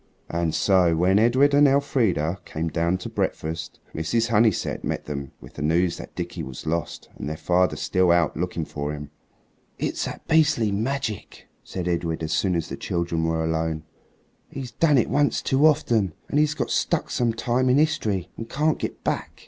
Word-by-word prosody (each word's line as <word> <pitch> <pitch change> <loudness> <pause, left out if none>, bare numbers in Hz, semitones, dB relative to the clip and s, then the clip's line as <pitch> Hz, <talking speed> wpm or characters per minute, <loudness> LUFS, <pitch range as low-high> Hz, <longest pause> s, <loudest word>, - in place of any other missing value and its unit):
And 85 -1 0
so, 90 -4 +3
when 95 +4 +3
Edred 130 +6 +4
and 145 +1 +6
Elfrida 115 - +1
came 80 +1 -3
down 85 +2 0
to 90 - -7
breakfast, 80 0 -3
Mrs. 95 +10 0
Honeysett 110 -2 +2
met - - -3
them 70 -3 -5
with - - -13
the - - -8
news 85 +3 +1
that - - -10
Dickie 85 -1 -4
was 65 -2 -8
lost 85 +1 -3
and 75 - -5
their 80 - -4
father 90 +2 +2
still 90 -1 +1
out 85 -1 +3
looking 85 -1 -2
for 75 0 -4
him. 75 -1 -8 0.7
"It's - - -2
that - - -7
beastly 150 -9 +3
magic," 110 0 -3 0.2
said 90 -2 -5
Edred 85 -2 -1
as 80 - -2
soon 95 -3 +1
as 85 - -1
the - - -6
children 85 -2 -1
were 80 0 0
alone. 80 -1 -1 0.7
"He's 130 -3 -6
done 150 +1 +3
it 120 - +3
once 145 0 +2
too 140 +4 +3
often, 115 - +1
and 145 - +2
he's 150 -1 +2
got - - -2
stuck - - 0
some 120 -2 +1
time 120 +3 0
in 125 - +4
history 105 - 0
and 115 - -7
can't 155 +2 +1
get - - -5
back." - - -3
90 Hz, 185 wpm, -24 LUFS, 80-125 Hz, 0.7 s, and